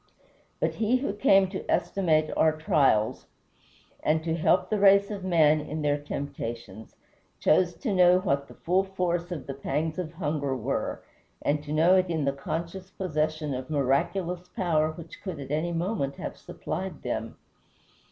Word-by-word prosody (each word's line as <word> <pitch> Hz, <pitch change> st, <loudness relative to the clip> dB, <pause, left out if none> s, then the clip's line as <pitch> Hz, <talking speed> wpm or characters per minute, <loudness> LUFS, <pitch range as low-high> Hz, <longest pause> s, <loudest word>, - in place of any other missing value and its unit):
But -, -, 0 dB
he 230 Hz, +3 st, +2 dB
who 255 Hz, -6 st, -2 dB
came 195 Hz, -2 st, +4 dB
to 190 Hz, -, -5 dB
estimate 155 Hz, -5 st, +1 dB
our 160 Hz, -1 st, +4 dB
trials, 135 Hz, -8 st, +2 dB, 0.7 s
and 160 Hz, +1 st, +1 dB
to 165 Hz, -1 st, -1 dB
help 165 Hz, -, +2 dB
the 215 Hz, -, +1 dB
race 200 Hz, +1 st, +5 dB
of 200 Hz, -2 st, -5 dB
man 155 Hz, -4 st, +4 dB
in 150 Hz, +1 st, -5 dB
their 145 Hz, 0 st, +1 dB
temptations, 120 Hz, -6 st, -6 dB, 0.4 s
chose 175 Hz, +2 st, +3 dB
to 230 Hz, -8 st, -2 dB
know 180 Hz, -1 st, +6 dB
what 140 Hz, -7 st, -1 dB
the -, -, -14 dB
full 185 Hz, +3 st, +1 dB
force 175 Hz, -3 st, -2 dB
of 155 Hz, -6 st, -5 dB
the 135 Hz, -, -5 dB
pangs 155 Hz, +4 st, -2 dB
of 165 Hz, -3 st, -4 dB
hunger 145 Hz, -5 st, -2 dB
were, 115 Hz, -, -3 dB, 0.4 s
and 145 Hz, +1 st, 0 dB
to 145 Hz, -, -6 dB
know 165 Hz, +5 st, +5 dB
it 185 Hz, -1 st, +1 dB
in 160 Hz, -4 st, 0 dB
the 140 Hz, -, +1 dB
conscious 170 Hz, +7 st, -5 dB
possession 155 Hz, -5 st, -2 dB
of 130 Hz, +1 st, -5 dB
miraculous 165 Hz, +6 st, 0 dB
power 165 Hz, -7 st, +2 dB
which 160 Hz, 0 st, -11 dB
could 185 Hz, -6 st, -5 dB
at 135 Hz, 0 st, -7 dB
any 160 Hz, +3 st, 0 dB
moment 170 Hz, -5 st, -2 dB
have -, -, -6 dB
supplied 180 Hz, +1 st, -6 dB
them. 115 Hz, -2 st, -4 dB
160 Hz, 165 wpm, -27 LUFS, 145-185 Hz, 0.7 s, know